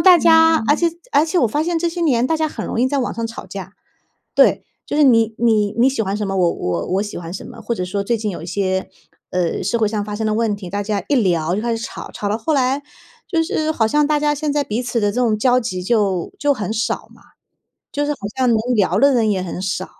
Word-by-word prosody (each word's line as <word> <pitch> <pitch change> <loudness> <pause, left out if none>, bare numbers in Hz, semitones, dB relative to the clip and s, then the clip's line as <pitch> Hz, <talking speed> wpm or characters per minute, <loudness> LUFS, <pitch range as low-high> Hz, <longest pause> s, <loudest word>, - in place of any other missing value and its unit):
大 365 -2 +7
家， 325 -2 +5
而 290 - +6
且 340 +2 +2 0.2
而 295 - +5
且 330 +3 0
我 245 - +4
发 295 +8 0
现 340 +1 0
这 340 +1 0
些 345 +1 -5
年 250 -7 +2
大 320 - +1
家 315 0 0
很 - - -6
容 230 - -2
易 255 - +3
在 285 +1 0
网 250 - -2
上 230 - -3
吵 230 - -9
架。 195 0 -8 0.6
对， - - +4 0.2
就 - - -3
是 300 - +4
你 230 -5 +4
你 215 -3 +2
你 245 +3 +5
喜 270 -3 -2
欢 195 -1 -2
什 210 -1 -2
么， 195 - -2
我 175 -2 +3
我 85 -1 -3
我 195 - +2
喜 210 0 -6
欢 170 -1 -7
什 - - -6
么， - - -11
或 235 - -2
者 185 - -3
说 200 +2 -3
最 235 +3 +1
近 215 -1 -3
有 175 - -6
一 - - -7
些， 190 0 -1 0.4
呃， 180 -2 -1
社 205 +5 0
会 220 -2 +2
上 210 -1 -2
发 210 0 -5
生 220 +1 -3
的 215 - +1
问 225 -1 +1
题， 190 -3 -9
大 200 +2 -2
家 205 -1 -2
一 285 - +3
聊 175 -6 +1
就 210 - -1
开 235 -1 0
始 225 - -5
吵， - - -7
吵 205 - -3
到 210 +2 -1
后 315 +8 -1
来， 270 +1 +1 0.5
就 330 -3 +1
是 315 -1 -1
好 225 -6 +1
像 295 +5 +2
大 300 0 +1
家 295 0 +2
现 295 0 -2
在 290 0 +1
彼 220 -1 -2
此 240 -1 -1
的 205 -1 +2
这 - - -8
种 225 -3 +2
交 250 +3 +3
集 185 -6 -4
就 195 -4 0
就 290 -1 +2
很 215 -3 -3
少 225 +1 -2
嘛， - - -20 0.7
就 290 - -1
是 295 - -1
好 - - -8 0.2
像 260 - +2
能 225 - +3 0.2
聊 190 -2 +2
的 280 0 +5
人 225 -3 +2
也 190 -3 0
很 180 0 -5
少。 185 -1 -2
225 Hz, 295 characters per minute, -19 LUFS, 200-285 Hz, 0.7 s, 大